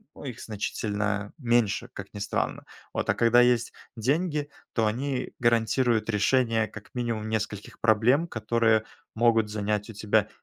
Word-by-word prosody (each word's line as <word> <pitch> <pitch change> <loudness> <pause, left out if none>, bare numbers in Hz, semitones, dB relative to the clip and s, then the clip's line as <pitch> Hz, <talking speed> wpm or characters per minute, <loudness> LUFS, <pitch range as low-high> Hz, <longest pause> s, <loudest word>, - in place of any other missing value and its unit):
ну, - - -11
их 125 -5 -6
значительно 105 -1 -2
меньше, 120 -3 +1
как 100 -1 -9
ни 100 - -7
странно. 105 +1 -2 0.3
Вот, - - -2
а - - +5
когда 115 +1 +5
есть 120 -2 +2 0.2
деньги, 150 +5 0 0.2
то 110 -2 +2
они 130 +3 -2
гарантируют 120 0 +2
решение, 115 +1 +2
как 110 -1 -12
минимум, 115 -3 -2
нескольких 110 -2 -4
проблем, 115 +8 +3
которые 110 -3 +1 0.3
могут 115 -2 +3
занять 105 0 -1
у - - -7
тебя 105 0 +1
115 Hz, 145 wpm, -27 LUFS, 105-120 Hz, 0.3 s, а